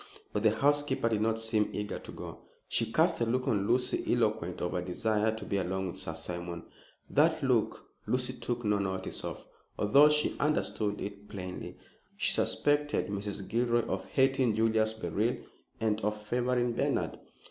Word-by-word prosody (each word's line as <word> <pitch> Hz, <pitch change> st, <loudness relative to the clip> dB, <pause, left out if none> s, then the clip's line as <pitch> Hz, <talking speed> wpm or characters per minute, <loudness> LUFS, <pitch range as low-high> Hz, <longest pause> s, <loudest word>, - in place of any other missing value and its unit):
But 105 Hz, -, 0 dB
the 110 Hz, -, +5 dB
housekeeper 140 Hz, +1 st, +2 dB
did 110 Hz, -2 st, 0 dB
not 110 Hz, 0 st, +1 dB
seem 110 Hz, -2 st, +1 dB
eager 105 Hz, 0 st, -3 dB
to -, -, -10 dB
go. -, -, -8 dB, 0.3 s
She 115 Hz, -1 st, 0 dB
cast 160 Hz, 0 st, +2 dB
a -, -, +3 dB
look 125 Hz, +3 st, 0 dB
on 100 Hz, -5 st, +1 dB
Lucy 125 Hz, +1 st, +2 dB
eloquent -, -, 0 dB
of 90 Hz, -, -2 dB
a 90 Hz, -, 0 dB
desire 105 Hz, +4 st, 0 dB
to 110 Hz, -, -7 dB
be 100 Hz, -, -1 dB
alone 95 Hz, 0 st, -1 dB
with -, -, -7 dB
Sir -, -, -5 dB
Simon. 85 Hz, -1 st, -5 dB, 0.4 s
That -, -, +3 dB
look -, -, +1 dB, 0.2 s
Lucy 125 Hz, 0 st, +1 dB
took 120 Hz, -2 st, -4 dB
no 105 Hz, -1 st, +2 dB
notice 95 Hz, -1 st, -3 dB
of, -, -, -6 dB, 0.3 s
although 140 Hz, +9 st, +6 dB
she 150 Hz, 0 st, +2 dB
understood 110 Hz, -8 st, 0 dB
it 100 Hz, 0 st, -7 dB
plainly. 90 Hz, -2 st, -6 dB, 0.4 s
She -, -, +3 dB
suspected 145 Hz, -4 st, +1 dB
Mrs. 100 Hz, -1 st, -4 dB
Gilroy 120 Hz, 0 st, +1 dB
of 95 Hz, -, -3 dB
hating 135 Hz, -4 st, +2 dB
Julius 110 Hz, 0 st, +2 dB
Beryl 110 Hz, +1 st, -1 dB, 0.4 s
and 110 Hz, -1 st, 0 dB
of 105 Hz, +1 st, -1 dB
favoring 120 Hz, +2 st, 0 dB
Bernard. -, -, -1 dB
110 Hz, 170 wpm, -30 LUFS, 100-125 Hz, 0.4 s, although